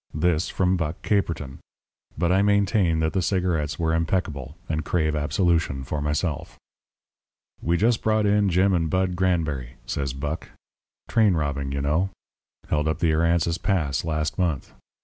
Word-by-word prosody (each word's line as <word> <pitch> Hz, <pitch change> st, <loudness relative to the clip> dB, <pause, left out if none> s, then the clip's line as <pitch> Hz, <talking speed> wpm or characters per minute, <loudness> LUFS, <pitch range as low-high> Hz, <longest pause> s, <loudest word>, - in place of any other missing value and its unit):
This 80 Hz, +1 st, +1 dB
from 95 Hz, 0 st, +1 dB
Buck 80 Hz, -1 st, -3 dB
Caperton! 85 Hz, -9 st, -1 dB, 0.6 s
But 85 Hz, +2 st, +1 dB
I 95 Hz, +1 st, +4 dB
maintain 100 Hz, -5 st, +2 dB
that 80 Hz, 0 st, 0 dB
the 95 Hz, -, +1 dB
cigarettes 90 Hz, -5 st, 0 dB
were 80 Hz, -1 st, 0 dB
impeccable, 80 Hz, -4 st, -1 dB
and 80 Hz, 0 st, -1 dB
crave 80 Hz, -3 st, 0 dB
absolution 75 Hz, -2 st, +1 dB
for 75 Hz, +3 st, -3 dB
myself. 75 Hz, +1 st, -2 dB, 1.0 s
"We 85 Hz, +1 st, +1 dB
just 115 Hz, +4 st, +2 dB
brought 110 Hz, -1 st, +2 dB
in 105 Hz, -1 st, +3 dB
Jim 95 Hz, +2 st, +3 dB
and 80 Hz, -3 st, +1 dB
Bud 95 Hz, 0 st, 0 dB
Granberry," 80 Hz, -9 st, 0 dB
said 70 Hz, -1 st, -3 dB
Buck. 75 Hz, +3 st, -4 dB, 0.6 s
"Train 110 Hz, -5 st, +3 dB
robbing, 70 Hz, -3 st, -2 dB
you 70 Hz, 0 st, -2 dB
know. 80 Hz, +7 st, +1 dB, 0.6 s
Held 75 Hz, 0 st, 0 dB
up 80 Hz, -1 st, 0 dB
the 80 Hz, -1 st, +2 dB
Aransas 85 Hz, +1 st, +1 dB
Pass 85 Hz, -9 st, 0 dB
last 75 Hz, 0 st, -2 dB
month. 85 Hz, -7 st, -1 dB
85 Hz, 150 wpm, -24 LUFS, 75-95 Hz, 1.0 s, I